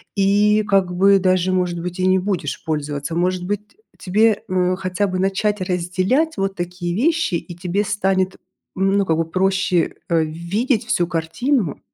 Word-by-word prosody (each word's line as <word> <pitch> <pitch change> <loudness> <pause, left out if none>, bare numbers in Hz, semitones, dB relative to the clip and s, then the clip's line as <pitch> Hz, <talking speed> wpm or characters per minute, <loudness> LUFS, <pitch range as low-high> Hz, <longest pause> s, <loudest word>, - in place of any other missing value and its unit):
и 205 +2 +3
как 195 -3 +1
бы 195 +2 +5
даже, 185 -1 +2
может 180 -2 0
быть, 180 +1 -5
и 185 - +2
не 185 0 +4
будешь 180 -6 -3
пользоваться. 150 0 -3
Может 180 +1 0
быть, 205 +2 -4
э, - - -41 0.2
тебе, 215 +3 +2
э, 185 0 +1
хотя 185 +2 -1
бы 185 -1 -3
начать 195 +2 0
разделять 185 - 0
вот 195 0 -1
такие 175 0 -4
вещи, 320 - +1
и 175 0 -5
тебе 180 +3 -1
станет, 190 -2 0 0.4
ну, 195 +1 +2
как 160 -2 +1
бы 165 - 0
проще, 185 -1 +1
э, 165 -2 +3
видеть 195 - -1
всю 175 - +1
картину? 175 - -1
185 Hz, 165 wpm, -20 LUFS, 175-200 Hz, 0.4 s, бы